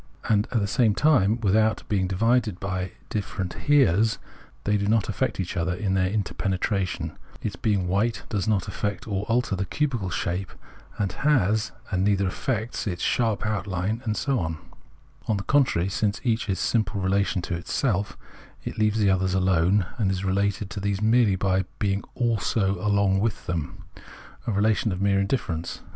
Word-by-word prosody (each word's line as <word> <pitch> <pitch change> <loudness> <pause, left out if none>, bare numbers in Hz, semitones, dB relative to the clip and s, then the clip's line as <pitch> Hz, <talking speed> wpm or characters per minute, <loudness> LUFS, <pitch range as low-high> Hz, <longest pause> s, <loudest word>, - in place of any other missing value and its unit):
And 105 -1 +2
at 115 - +2
the 100 - 0
same 110 0 +2
thne, 120 -7 +3
without 110 +1 +2
being 95 -3 +1
divided 110 0 +1
by 95 -1 -3 0.2
different 95 -3 -3
Heres, 115 - +4 0.5
they 105 - +1
do 100 -1 0
not 110 0 +2
affect 115 +1 -1
each 95 0 -3
other 90 0 0
in 100 -1 -1
their 95 -1 +2
inter 100 -1 -2
penetration; 95 -4 -1 0.3
its 100 -4 -2
being 95 -1 0
white 100 +6 0
does 100 -2 -2
not 105 -4 +1
affect 100 -2 -3
or 100 -1 -2
alter 115 -2 +1
the 95 - -1
cubical 120 -4 -1
shape 90 +1 -2 0.5
it 100 -3 0
has, 110 -6 +2 0.2
and 95 -1 +1
neither 100 -1 +2
affects 110 +4 -2
its 90 -3 -3
sharp 115 -4 +1
outhne, 105 +1 -2
and 110 -4 -1
so 140 -3 0
on: 80 -3 -2 0.7
on 110 - +1
the 100 - -4
contrary, 130 -11 +2
since 105 +3 0
each 115 -3 0
is 95 - +1
simple 110 -2 0
relation 95 0 +1
to 85 -1 -3
self, 105 -7 0 0.5
it - - -5
leaves 110 0 +2
the 100 -3 +3
others 95 0 +1
alone 95 +1 +3
and 100 -4 +2
is 95 0 -2
related 100 +1 0
to - - -4
these 100 0 -1
merely 110 -1 +4
by 95 0 +1
being 100 -1 0
also 105 -4 0
along 100 -2 +3
with 110 +1 -1
them, 85 -4 -4 0.6
a - - +1
relation 105 +2 +2
of 90 - -3
mere 100 0 +2
indifference. 100 -6 -2
100 Hz, 175 wpm, -25 LUFS, 95-110 Hz, 0.7 s, Heres